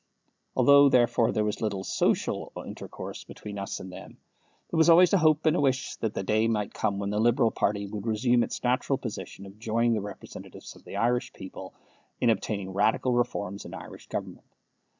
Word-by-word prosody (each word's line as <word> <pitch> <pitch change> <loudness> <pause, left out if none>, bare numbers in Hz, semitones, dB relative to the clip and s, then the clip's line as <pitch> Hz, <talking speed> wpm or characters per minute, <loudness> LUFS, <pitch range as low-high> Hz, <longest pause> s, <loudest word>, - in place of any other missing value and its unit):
Although, 140 0 +7
therefore, 120 -2 +3
there 110 - 0
was 105 -1 -2
little 100 -3 -2
social - - 0
intercourse - - -8
between 105 -1 -8
us 100 - -4
and 95 - -8
them, - - -11 0.5
there 170 - -1
was 160 - +5
always 175 +3 +7
a 195 - +5
hope 155 -1 +3
and 155 +1 +4
a - - +1
wish 130 -2 0
that 110 -2 -3
the - - -2
day 110 +3 +2
might 105 -3 -1
come 100 -2 -1
when 100 0 -2
the 105 - 0
Liberal 115 0 +3
party 100 0 -1
should 105 +2 -6
resume 120 +2 +2
its - - -3
natural 130 +2 +1
position 105 -4 -7
of 100 +2 -13
joining 115 +1 +1
the 110 - 0
representatives 105 +1 -10
of - - -18
the - - -8
Irish 120 +4 0
people 95 0 -9 0.4
in 120 - +4
obtaining 100 -2 -2
radical 110 +5 +2
reforms 100 -5 -1
in - - -9
Irish - - -11
government. - - -6
110 Hz, 190 wpm, -27 LUFS, 100-125 Hz, 0.5 s, Although